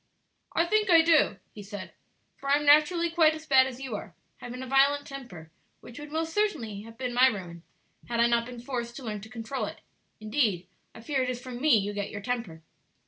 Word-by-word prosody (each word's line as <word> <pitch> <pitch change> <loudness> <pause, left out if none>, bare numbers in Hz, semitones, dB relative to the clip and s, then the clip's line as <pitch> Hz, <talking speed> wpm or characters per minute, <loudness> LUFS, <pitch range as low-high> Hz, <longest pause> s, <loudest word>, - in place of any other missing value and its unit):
"I 335 - +2
think 420 +2 +1
I 335 -2 +8
do," 315 - +4 0.2
he 210 - -9
said; 200 -1 -8 0.4
"for 275 - -7
I 280 - +6
am 295 0 -1
naturally 325 +4 +5
quite 320 -2 +4
as 315 0 -10
bad 265 -3 +5
as 255 -1 -8
you 265 -5 -5
are, 200 -3 -8 0.2
having 250 +1 -7
a - - -5
violent 275 +2 +3
temper, 190 - -10 0.3
which 240 +3 -12
would 295 0 -9
most 325 +1 -2
certainly 235 - -1
have 225 +1 -13
been 250 -2 -3
my 250 +2 +6
ruin 180 -8 -4 0.5
had 235 -1 -1
I 235 - +6
not 235 0 +1
been 245 -1 -8
forced 240 -1 -5
to 270 - -8
learn 210 -3 -4
to 220 - -11
control 230 +3 -4
it; - - -9 0.4
indeed 215 -5 0 0.3
I - - -10
fear 270 +3 -1
it 255 - -1
is 250 -1 -3
from 250 -1 -8
me 295 -6 +5
you 205 0 -2
get 205 -1 -3
your 205 - -7
temper. 205 -8 -4
250 Hz, 225 wpm, -28 LUFS, 220-290 Hz, 0.5 s, I